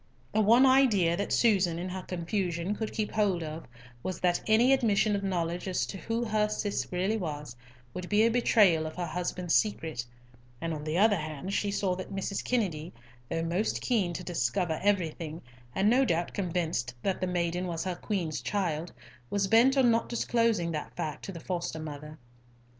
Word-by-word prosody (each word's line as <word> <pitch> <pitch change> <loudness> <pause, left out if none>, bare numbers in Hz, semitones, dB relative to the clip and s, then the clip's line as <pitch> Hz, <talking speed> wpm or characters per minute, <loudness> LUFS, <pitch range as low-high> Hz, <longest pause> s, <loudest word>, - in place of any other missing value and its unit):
The 215 - +3
one 230 +5 +6
idea 235 -11 +4
that 200 +3 -3
Susan, 190 -7 +3
in 175 +2 -4
her 185 +1 -4
confusion, 180 +1 -2
could 220 +1 -3
keep 215 -2 -2
hold 195 -6 +1
of 155 +1 -7 0.3
was 185 +3 -4
that 175 -1 +2
any 235 +5 +5
admission 215 -5 +2
of 200 - -2
knowledge 175 -2 -2
as 185 - 0
to 195 - -7
who 230 +3 -2
her 215 -1 +1
Cis 210 -1 -2
really 190 +5 0
was, 150 - -5 0.4
would 180 0 -6
be 210 +1 +4
a 230 - +4
betrayal 205 -9 +4
of 155 - -8
her 180 - -2
husband's 175 +1 -2
secret; 160 - +1 0.6
and 165 0 -3
on 150 -1 -5
the 155 +2 -1
other 205 +1 +5
hand 155 +4 -5
she 205 - 0
saw 195 -2 0
that 185 - -7
Mrs. 195 0 -3
Kennedy, 180 -9 -1 0.4
though 165 0 -1
most 175 +6 0
keen 210 -9 +1
to 180 - -5
discover 165 +1 -1
everything, 170 -5 0 0.4
and 195 +2 +2
no 250 +5 +5
doubt 170 -7 0
convinced 165 -10 -2
that 190 -2 -1
the 185 - 0
maiden 175 0 -1
was 165 -2 -3
her 185 - -2
Queen's 175 -5 -3
child, 170 -5 -2 0.4
was 200 -1 0
bent 240 +6 +5
on 250 -3 +5
not 230 0 +1
disclosing 230 -7 +1
that 150 -2 -5
fact 155 -1 -4
to - - -5
the 170 - -8
foster 175 -2 -3
mother. 150 0 -7
185 Hz, 185 wpm, -29 LUFS, 165-210 Hz, 0.6 s, one